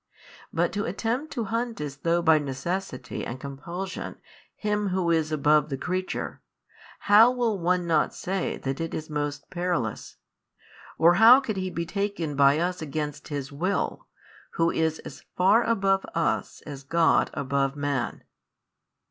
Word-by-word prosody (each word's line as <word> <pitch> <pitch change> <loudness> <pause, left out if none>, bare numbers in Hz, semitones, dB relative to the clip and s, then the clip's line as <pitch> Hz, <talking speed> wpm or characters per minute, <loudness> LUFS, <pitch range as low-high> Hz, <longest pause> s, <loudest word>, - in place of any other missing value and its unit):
But - - +1
to 205 -1 -2
attempt 235 - -2
to 240 - -2
hunt 235 0 -2
as 145 -2 -5
though 170 +3 +1
by 160 -2 +5
necessity 140 0 -4
and 125 +2 -5
compulsion 170 +8 -6 0.4
Him 210 -1 -1
Who 180 -2 0
is 160 -1 +1
above 150 0 +3
the 135 - -3
creature, 185 +6 -3 0.6
how 210 +4 +7
will 240 -5 0
one 180 +1 +1
not 165 -2 +1
say 190 0 -2
that 135 +3 -4
it 165 - -3
is 155 0 -6
most 145 -1 -3
perilous? 175 - -2 0.8
or 170 +2 +6
how 240 +4 +10
could 225 -7 -4
He 185 0 -2
be 170 -2 -3
taken 200 -6 -2
by 140 +1 +5
us 180 +2 -1
against 150 -1 -4
His 140 -2 -5
Will, 180 +8 -2 0.5
Who 165 0 +2
is 160 -1 0
as - - -10
far 195 +6 +5
above 195 -4 +2
us 165 - -1
as 140 -3 -8
God 165 +4 +2
above 140 0 0
Man? 145 -2 -2
170 Hz, 150 wpm, -26 LUFS, 145-195 Hz, 0.8 s, how